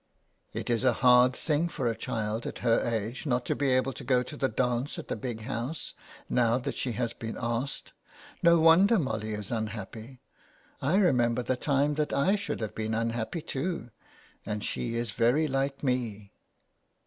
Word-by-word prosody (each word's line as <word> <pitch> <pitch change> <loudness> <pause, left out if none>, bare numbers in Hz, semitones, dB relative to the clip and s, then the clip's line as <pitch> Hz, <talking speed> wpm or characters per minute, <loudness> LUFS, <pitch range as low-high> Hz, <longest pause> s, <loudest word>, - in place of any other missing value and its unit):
" - - -45
It - - -3
is 115 +1 +1
a 130 -2 +4
hard 125 +1 +7
thing 160 +1 0
for 135 -6 -2
a 115 - 0
child 110 +1 -3
at - - -5
her 115 -1 +5
age 115 +4 -2
not 125 -2 +1
to - - 0
be 140 -1 +1
able 130 +1 +2
to - - -8
go 125 0 +2
to 145 - -8
the 135 -2 0
dance 125 +3 -1
at - - -7
the - - -1
Big 115 0 -5
House, 125 +6 -4 0.3
now 120 -1 +3
that 130 - -3
she 125 - -2
has 115 +1 -2
been 115 -1 -6
asked. 120 +4 -3 0.5
No 170 -1 +6
wonder 175 +8 +6
Molly 110 - -2
is 105 -2 -6
unhappy. 110 +2 -5 0.6
I 150 +7 +2
remember 125 - +3
the 130 - 0
time 140 +2 +1
that 150 - -2
I 165 +9 +3
should 200 - -3
have 110 - -3
been 110 0 -2
unhappy 115 +7 -2
too, 135 -4 -3 0.5
and 105 -1 -4
she 115 -1 -2
is 115 -2 -1
very 125 +9 +2
like 135 0 -1
me." 115 -6 -2
125 Hz, 185 wpm, -29 LUFS, 115-140 Hz, 0.6 s, hard